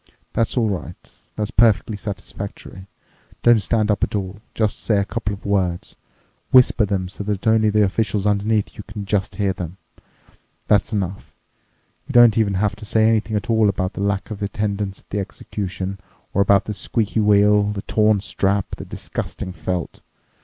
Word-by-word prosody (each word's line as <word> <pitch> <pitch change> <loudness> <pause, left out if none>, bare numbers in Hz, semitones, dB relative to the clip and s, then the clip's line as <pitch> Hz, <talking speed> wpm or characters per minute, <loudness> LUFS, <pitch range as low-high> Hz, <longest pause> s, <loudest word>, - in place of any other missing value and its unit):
That's 115 +2 0
all 115 -2 +3
right. 90 -4 -6 0.2
That's 105 -1 -2
perfectly 110 -1 +3
satisfactory. 100 -1 -7 0.6
Don't 120 -2 +6
stand 110 -1 +1
up 105 - 0
at - - 0
all. 100 0 -4
Just 110 -2 0
say 105 - +1
a 100 - +1
couple 105 +1 -3
of 95 - -17
words. 95 -4 -1 0.5
Whisper 125 -3 +5
them 95 -2 -1
so 100 +2 -6
that 100 -1 -3
only 110 -1 +4
the 105 0 +3
officials 105 0 0
underneath 105 +1 +1
you 105 - -8
can 105 -1 -6
just 100 -1 -1
hear 100 -2 0
them. 90 0 -7 0.9
That's 105 +1 +3
enough. 95 -3 -4 0.7
You - - -6
don't 120 -3 +7
even 105 -3 +2
have 100 +1 0
to 110 - -11
say 110 +1 +3
anything 110 -1 +1
at 105 +3 -2
all 110 -2 +4
about 95 -1 -2
the - - -5
lack 100 +1 -1
of 105 -1 -6
attendance 100 -1 -2
at - - -38
the 100 - -1
execution 95 -1 -5 0.3
or 100 - +2
about 100 0 +4
the 105 - -3
squeaky 110 +1 -1
wheel, 105 0 +4
the 105 -1 -3
torn 105 -2 +2
strap, 100 -1 -1
the - - -7
disgusting 90 - -5
felt. 85 0 -4
105 Hz, 175 wpm, -21 LUFS, 100-110 Hz, 0.9 s, don't